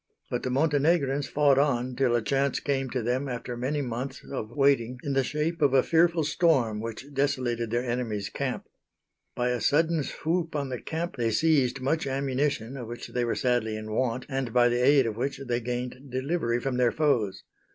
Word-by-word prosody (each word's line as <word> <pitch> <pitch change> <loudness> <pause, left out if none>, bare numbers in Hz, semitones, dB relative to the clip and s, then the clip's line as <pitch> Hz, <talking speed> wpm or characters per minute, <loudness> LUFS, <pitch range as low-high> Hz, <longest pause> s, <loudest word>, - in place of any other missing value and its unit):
But - - -1
the - - -2
Montenegrins 145 0 +2
fought 140 -1 +3
on 130 -3 +1
till 125 -2 +2
a 120 - +1
chance 140 +4 +1
came 135 -2 -1
to 125 -1 -2
them 130 +4 -1
after 125 0 -4
many 140 +4 -1
months 125 +2 -5
of 110 -5 -4
waiting 130 -2 +2
in 140 - -2
the 135 0 +2
shape 155 +5 -2
of 140 -2 +4
a 130 - +5
fearful 165 0 +3
storm 145 -8 +2
which 115 +6 -7
desolated 130 -4 0
their 120 +2 -1
enemies' 115 -5 -2
Camp. 130 +3 -3 0.7
By 125 0 0
a 125 -2 -1
sudden 160 +5 +2
swoop 165 +3 -2
on 140 -2 -2
the 125 -2 -4
camp 165 -1 -4
they 115 -2 +1
seized 135 0 +2
much 140 +3 0
ammunition 135 -2 -1
of 120 -3 -6
which 120 +1 -7
they 125 - -1
were 120 - 0
sadly 120 -3 0
in 110 0 -7
want 125 +2 -1
and 135 -4 -2
by 120 0 +4
the 120 +1 +1
aid 140 0 +5
of 110 -2 -3
which 135 +2 -2
they 120 -1 0
gained 125 +3 -5
delivery 130 -2 -1
from 130 0 -2
their 125 -2 +3
foes. 115 -11 0
130 Hz, 195 wpm, -27 LUFS, 120-145 Hz, 0.7 s, a